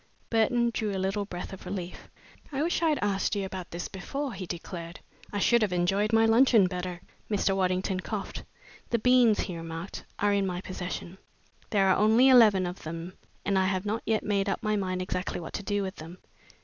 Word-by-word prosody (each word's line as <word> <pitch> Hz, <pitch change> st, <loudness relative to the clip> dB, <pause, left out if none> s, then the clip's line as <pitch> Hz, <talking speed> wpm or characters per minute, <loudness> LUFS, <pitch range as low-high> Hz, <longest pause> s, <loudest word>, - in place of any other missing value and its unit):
Burton 235 Hz, +1 st, +2 dB
drew 215 Hz, -2 st, -1 dB
a -, -, -2 dB
little 195 Hz, +2 st, -1 dB
breath 180 Hz, -1 st, -7 dB
of 190 Hz, -, -9 dB
relief. 180 Hz, -3 st, -6 dB, 0.4 s
"I 280 Hz, +1 st, -1 dB
wish 345 Hz, +1 st, 0 dB
I'd 315 Hz, -3 st, +3 dB
asked 200 Hz, +1 st, 0 dB
you 200 Hz, -1 st, -1 dB
about 190 Hz, -2 st, -6 dB
this 170 Hz, +1 st, -5 dB
before," 275 Hz, +7 st, -4 dB
he 190 Hz, -2 st, -6 dB
declared. 170 Hz, 0 st, -6 dB, 0.3 s
"I 205 Hz, -, -3 dB
should 235 Hz, +4 st, +4 dB
have 210 Hz, -3 st, +1 dB
enjoyed 195 Hz, +4 st, +1 dB
my 225 Hz, 0 st, +5 dB
luncheon 225 Hz, -2 st, +5 dB
better." 180 Hz, -1 st, -4 dB, 0.3 s
Mr. 200 Hz, -2 st, +1 dB
Waddington 185 Hz, 0 st, 0 dB
coughed. 200 Hz, +1 st, -5 dB, 0.5 s
"The 235 Hz, -, +2 dB
beans," 245 Hz, -2 st, +4 dB
he 180 Hz, -, -4 dB
remarked, 165 Hz, +2 st, -6 dB
"are 205 Hz, 0 st, +2 dB
in 200 Hz, -1 st, +1 dB
my 180 Hz, -1 st, -3 dB
possession. 185 Hz, 0 st, -6 dB, 0.5 s
There 200 Hz, -3 st, +3 dB
are 190 Hz, -, +4 dB
only 225 Hz, +5 st, +5 dB
eleven 215 Hz, -7 st, +6 dB
of 180 Hz, +1 st, -5 dB
them 165 Hz, +3 st, -6 dB, 0.3 s
and 195 Hz, -1 st, +2 dB
I 190 Hz, -, +2 dB
have 190 Hz, 0 st, -1 dB
not 215 Hz, +2 st, -1 dB
yet 220 Hz, -1 st, 0 dB
made 200 Hz, -1 st, 0 dB
up 195 Hz, -, -2 dB
my 215 Hz, -1 st, +1 dB
mind 185 Hz, -2 st, -1 dB
exactly 180 Hz, -1 st, -3 dB
what 165 Hz, -, -8 dB
to -, -, -3 dB
do 205 Hz, 0 st, -1 dB
with 190 Hz, +1 st, -5 dB
them." 165 Hz, +3 st, -9 dB
195 Hz, 200 wpm, -28 LUFS, 185-215 Hz, 0.5 s, eleven